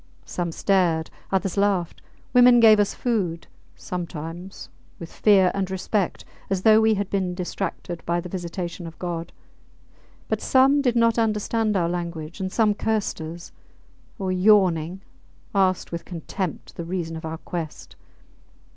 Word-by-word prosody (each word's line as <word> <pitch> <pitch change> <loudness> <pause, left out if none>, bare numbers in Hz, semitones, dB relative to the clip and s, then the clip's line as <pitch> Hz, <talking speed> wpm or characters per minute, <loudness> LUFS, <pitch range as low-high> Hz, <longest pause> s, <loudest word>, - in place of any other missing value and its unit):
Some 175 -2 -3
stared; 170 -3 +1 0.2
others 195 0 0
laughed; 195 -4 0 0.3
women 245 -1 +7
gave 220 -2 +7
us 205 - +1
food, 190 -9 -1 0.3
sometimes, 175 +1 -7 0.3
with 170 - -9
fear 195 -4 +4
and 195 -1 -2
respect, 190 0 -2 0.2
as 190 -1 -1
though 220 0 +6
we 220 0 +4
had 200 -1 -2
been 185 -3 -1
distracted 175 -1 -4
by 170 +1 0
the 175 - -6
visitation 175 -1 -5
of 165 - -11
God; 170 -2 -4 1.0
but - - -1
some 270 +2 +4
did 250 -4 +1
not 230 0 +3
understand 215 -1 +1
our 170 -2 +1
language, 170 -1 -5
and 190 -1 -3
some 215 -1 +3
cursed 215 -4 -1
us, 165 +2 -8 0.7
or, 190 -3 -2
yawning, 185 -3 +3 0.5
asked 190 -2 +1
with 170 0 -4
contempt 175 0 -5
the 170 - -4
reason 165 -1 -4
of 160 - -7
our 160 0 -4
quest. 165 -2 -7
185 Hz, 145 wpm, -24 LUFS, 170-210 Hz, 1.0 s, women